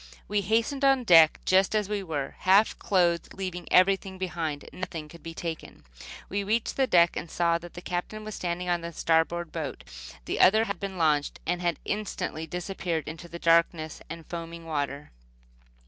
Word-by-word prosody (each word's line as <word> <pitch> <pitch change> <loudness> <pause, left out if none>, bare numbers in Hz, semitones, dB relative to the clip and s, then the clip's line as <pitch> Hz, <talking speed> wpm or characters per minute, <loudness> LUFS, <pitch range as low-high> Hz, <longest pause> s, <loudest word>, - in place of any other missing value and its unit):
We 205 0 +1
hastened 230 +8 0
on 270 -2 +4
deck 165 -7 +7
just 190 +3 +3
as 210 -2 +1
we 210 -1 -2
were, 150 -7 -4
half 195 +4 +4
clothed, 175 -3 +1
leaving 185 -2 -5
everything 190 +1 +3
behind. 165 -5 -3
Nothing 170 -4 -6
could 170 +2 -14
be 165 0 -8
taken. 165 -2 -6 0.4
When 200 - -2
we - - -1
reached 220 +3 0
the 265 -1 +2
deck 170 -6 +5
we - - -4
saw 170 0 +1
the 175 +1 -10
Captain 180 +5 -5
standing 180 -2 -3
by 175 -1 +1
the 170 0 -7
starboard 165 +1 +1
boat. - - -5 0.4
The - - -3
other 215 +4 +6
had 200 -5 -4
been 195 -1 -5
launched, 150 -3 +1
and 175 +1 -1
had 175 -3 0
instantly 200 -6 -3
disappeared 175 -1 -3
in 160 - -5
the 170 +1 -9
darkness 165 -2 +2
and 165 0 -8
foaming 170 -1 -7
water. 145 -2 -3
175 Hz, 175 wpm, -27 LUFS, 165-195 Hz, 0.4 s, deck